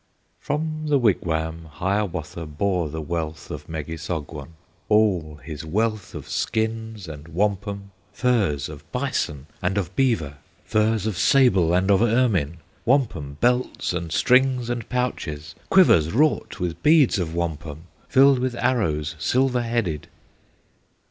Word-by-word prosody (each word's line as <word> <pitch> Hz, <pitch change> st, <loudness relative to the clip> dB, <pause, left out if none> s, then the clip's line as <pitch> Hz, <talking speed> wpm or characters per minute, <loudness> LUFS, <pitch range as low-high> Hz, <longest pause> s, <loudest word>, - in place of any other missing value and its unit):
From 155 Hz, +1 st, -3 dB
the 145 Hz, -1 st, +4 dB
wigwam 80 Hz, -8 st, 0 dB
Hiawatha 90 Hz, -4 st, -2 dB
Bore 85 Hz, +2 st, -1 dB
the 80 Hz, +1 st, -5 dB
wealth 80 Hz, -1 st, -4 dB
of -, -, -7 dB
Megissogwon, 80 Hz, -1 st, -5 dB, 0.4 s
All 95 Hz, -9 st, +2 dB
his 75 Hz, +1 st, -7 dB
wealth 110 Hz, +5 st, -1 dB
of -, -, -7 dB
skins 110 Hz, -3 st, -2 dB
and 75 Hz, -1 st, -9 dB
wampum, 100 Hz, +2 st, -2 dB, 0.2 s
Furs 100 Hz, -, +1 dB
of -, -, -12 dB
bison 70 Hz, -2 st, -2 dB, 0.2 s
and 90 Hz, +3 st, 0 dB
of 95 Hz, -2 st, -2 dB
beaver, 85 Hz, -, +1 dB, 0.3 s
Furs 110 Hz, -1 st, +1 dB
of 105 Hz, -5 st, -2 dB
sable 100 Hz, -12 st, +4 dB
and 95 Hz, +2 st, +2 dB
of 100 Hz, +1 st, +4 dB
ermine, 110 Hz, -, +2 dB, 0.3 s
Wampum 100 Hz, -, 0 dB
belts 125 Hz, -5 st, +1 dB
and 85 Hz, -2 st, -4 dB
strings 125 Hz, -, +3 dB
and 120 Hz, -2 st, -4 dB
pouches, 80 Hz, -, -3 dB, 0.2 s
Quivers 85 Hz, -, +5 dB
wrought 150 Hz, +7 st, +1 dB
with 90 Hz, -2 st, -3 dB
beads 150 Hz, -8 st, +5 dB
of 85 Hz, -2 st, -3 dB
wampum, 80 Hz, -2 st, -4 dB, 0.3 s
Filled 135 Hz, -1 st, +6 dB
with 125 Hz, -1 st, -1 dB
arrows, 90 Hz, -, 0 dB
silver 125 Hz, -, +2 dB
headed. 115 Hz, -11 st, -2 dB
95 Hz, 130 wpm, -23 LUFS, 80-120 Hz, 0.4 s, Filled